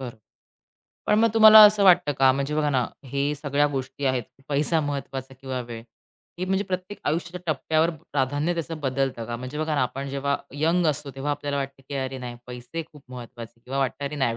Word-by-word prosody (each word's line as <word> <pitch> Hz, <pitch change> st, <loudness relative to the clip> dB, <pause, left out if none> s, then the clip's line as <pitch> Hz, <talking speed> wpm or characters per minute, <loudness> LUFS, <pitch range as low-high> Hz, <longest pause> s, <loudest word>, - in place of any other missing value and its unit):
बरं. 125 Hz, -4 st, -7 dB, 0.9 s
पण -, -, +3 dB
मग 230 Hz, +1 st, +5 dB
तुम्हाला 220 Hz, -1 st, +10 dB
असं 210 Hz, -1 st, +5 dB
वाटतं 175 Hz, -5 st, +5 dB
का? 135 Hz, -1 st, +4 dB
म्हणजे 140 Hz, +2 st, -2 dB
बघा 150 Hz, -1 st, +1 dB
ना, 125 Hz, -3 st, +1 dB, 0.2 s
हे 140 Hz, +3 st, -1 dB
सगळ्या 145 Hz, 0 st, +1 dB
गोष्टी 135 Hz, +1 st, -4 dB
आहेत. 130 Hz, -2 st, +1 dB, 0.3 s
पैसा 150 Hz, +3 st, +1 dB
महत्वाचा 135 Hz, -2 st, -5 dB
किंवा 130 Hz, -2 st, -4 dB
वेळ 115 Hz, -1 st, -7 dB, 0.6 s
हे 185 Hz, -, -1 dB
म्हणजे 190 Hz, +2 st, 0 dB
प्रत्येक 185 Hz, +1 st, -5 dB
आयुष्याच्या 175 Hz, +3 st, -2 dB
टप्प्यावर 160 Hz, +3 st, +1 dB
प्राधान्य 145 Hz, +1 st, -2 dB
त्याचं 165 Hz, -1 st, -4 dB
बदलतं 135 Hz, -3 st, -1 dB
का? 120 Hz, +1 st, -4 dB
म्हणजे 130 Hz, +5 st, -7 dB
बघा 155 Hz, -1 st, -1 dB
ना, 140 Hz, -, +2 dB
आपण 135 Hz, +2 st, -3 dB
जेव्हा 140 Hz, +1 st, -1 dB, 0.2 s
यंग 165 Hz, +3 st, +2 dB
असतो, 145 Hz, -1 st, -1 dB
तेव्हा 135 Hz, +2 st, -3 dB
आपल्याला 145 Hz, 0 st, -2 dB
वाटतं 135 Hz, -1 st, -5 dB
की 140 Hz, -, -5 dB
अरे 130 Hz, 0 st, -3 dB
नाही 120 Hz, -1 st, -7 dB
पैसे 125 Hz, +7 st, -6 dB
खूप 150 Hz, -2 st, -15 dB
महत्त्वाचे 120 Hz, -1 st, -10 dB
किंवा 135 Hz, +3 st, -5 dB
वाटतं 135 Hz, +1 st, -1 dB
अरे 150 Hz, +2 st, -4 dB
नाही 120 Hz, -4 st, 0 dB
140 Hz, 195 wpm, -25 LUFS, 130-155 Hz, 0.9 s, तुम्हाला